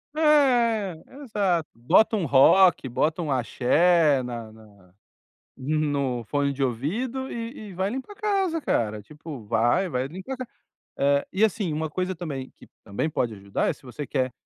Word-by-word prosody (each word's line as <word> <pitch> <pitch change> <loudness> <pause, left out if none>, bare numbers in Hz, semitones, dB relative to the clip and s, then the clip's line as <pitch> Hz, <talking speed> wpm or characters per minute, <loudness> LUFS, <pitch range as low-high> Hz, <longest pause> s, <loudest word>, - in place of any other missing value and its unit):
É, 240 - +3 0.2
exato. 190 - 0
Bota 175 - +3
um 190 - -1
rock, 145 +3 +5
bota 155 +7 0
um 150 - -3
axé 145 +4 +3
na 120 -3 -6
na 105 -3 -18 0.7
no 140 -3 -1
fone 140 +3 0
de 140 0 -2
ouvido 225 - -2
e 230 -2 -6
e 190 - -10
vai 190 +3 -1
limpar 265 - -6
a - - -23
casa, 390 -5 0
cara. 110 - -1
Tipo, 150 -3 -10
vai 120 - +2
vai 130 -3 -2
limpar 190 - -7
a 260 - -6
ca 255 - -6 0.5
eh, 140 0 +2
e 195 +4 +3
assim, 210 -6 0
uma 155 0 -2
coisa 185 +2 -2
também 145 -7 -6
que, - - -17 0.2
também 105 +9 -2
pode 120 -6 -1
ajudar, 100 0 -2
é - - +2
se - - -17
você 135 +2 -7
quer, 130 -3 -1
155 Hz, 170 wpm, -25 LUFS, 130-210 Hz, 0.7 s, rock